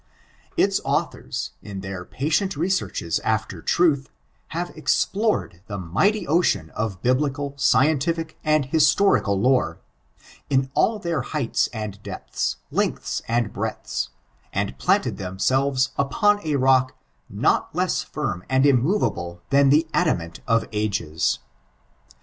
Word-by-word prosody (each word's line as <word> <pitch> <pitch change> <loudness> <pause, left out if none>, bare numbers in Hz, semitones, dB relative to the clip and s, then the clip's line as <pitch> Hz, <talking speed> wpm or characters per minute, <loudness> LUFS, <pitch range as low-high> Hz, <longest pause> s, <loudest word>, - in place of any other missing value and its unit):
Its - - +3
authors, - - -2
in 100 -2 -7
their 95 -2 -6
patient 155 - -1
researches 170 - -1
alter - - -1
tmth, 150 -6 +2 0.4
hare 175 +2 -4
explored 195 - 0
the 100 - -4
mighty 100 - +1
ocean 150 - +2
of 100 -4 -4
biblical, 140 +2 0
scientific, 155 +4 +2
and 155 -2 +2
historical 135 - +3
lore, 115 -9 +2 0.7
in 135 -1 +1
all 220 +7 +2
their 170 -8 -2
heights 135 -1 -1
and 105 -3 -6
deptiis, 65 - -3 0.2
lengtiis - - -1
and 115 -2 0
breadths, - - -3 0.4
and 65 - -2
planted 60 - +2
themsehres 130 +8 +1
npon 205 +9 +2
a 155 -2 0
rock 130 -1 +3 0.3
not - - +1
less - - +1
fiim 90 - -3
and 130 +1 +3
immovable 120 - +1
than 140 0 +5
the 155 +4 +4
adamant 85 - 0
of 115 -1 +2
ages. 100 -7 0
135 Hz, 120 wpm, -23 LUFS, 105-155 Hz, 0.7 s, than